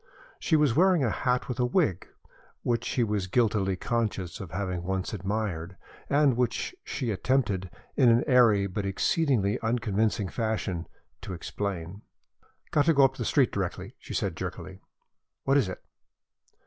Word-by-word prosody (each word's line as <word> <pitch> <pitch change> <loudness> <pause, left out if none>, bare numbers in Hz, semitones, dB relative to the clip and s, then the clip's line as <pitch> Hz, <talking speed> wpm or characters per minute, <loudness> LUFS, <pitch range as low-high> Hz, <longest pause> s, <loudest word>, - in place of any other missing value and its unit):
She 160 - +1
was 150 -6 +3
wearing 180 -2 +4
a 115 - +1
hat 125 +2 0
with 125 -1 -4
a - - +3
wing, 120 - +2 0.6
which 120 -2 0
he 125 - +1
was 105 -4 -1
guiltily 105 -3 +1
conscious 105 -4 -2
of 95 - -7
having 90 -1 -3
once 95 +2 -3
admired, 95 -3 -3 0.3
and 140 -3 +4
which 125 - -1
she 125 -5 -3
attempted, 105 -4 0 0.3
in 130 -4 +5
an 115 +1 +4
airy 115 -7 +5
but 100 +2 -3
exceedingly 105 - +1
unconvincing 110 -3 0
fashion, 110 -7 -2 0.3
to 95 - -6
explain. 95 +1 -5 0.7
"Got 145 -2 +3
to 165 -1 +4
go 140 -1 +7
up 135 0 0
the - - -2
street 135 -4 +3
directly," 95 -3 -4
she - - -7
said, - - -1
jerkily. - - -6 0.6
"What 135 - +2
is 120 -9 +2
it?" 90 - -8
110 Hz, 155 wpm, -28 LUFS, 95-125 Hz, 0.7 s, go